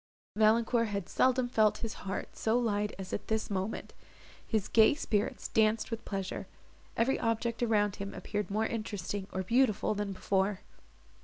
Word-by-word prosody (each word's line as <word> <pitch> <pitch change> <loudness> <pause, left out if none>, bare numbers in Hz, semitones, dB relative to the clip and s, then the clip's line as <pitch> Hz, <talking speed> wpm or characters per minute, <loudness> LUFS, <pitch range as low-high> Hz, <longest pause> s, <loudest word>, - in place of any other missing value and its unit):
Valancourt 225 +2 +3
had 200 -3 -3
seldom 255 -1 +2
felt 220 -3 +3
his 225 - -4 0.2
heart 190 - -4
so 225 +2 +1
light 210 -3 0
as 190 -1 -7
at - - -3
this 220 -1 -1
moment; 195 +2 -3 0.5
his 220 -4 0
gay 225 +5 +5
spirits 215 -8 -1
danced 220 +1 +2
with 230 - -4
pleasure; 195 -2 -4 0.5
every 245 +4 +2
object 230 0 -1
around 210 -4 +2
him 200 0 -5
appeared 210 -1 -3
more 215 +2 +1
interesting, 205 -3 -3
or 190 - -2
beautiful, 230 -1 +2
than 205 -1 -2
before. 190 +1 0
215 Hz, 155 wpm, -31 LUFS, 200-230 Hz, 0.5 s, gay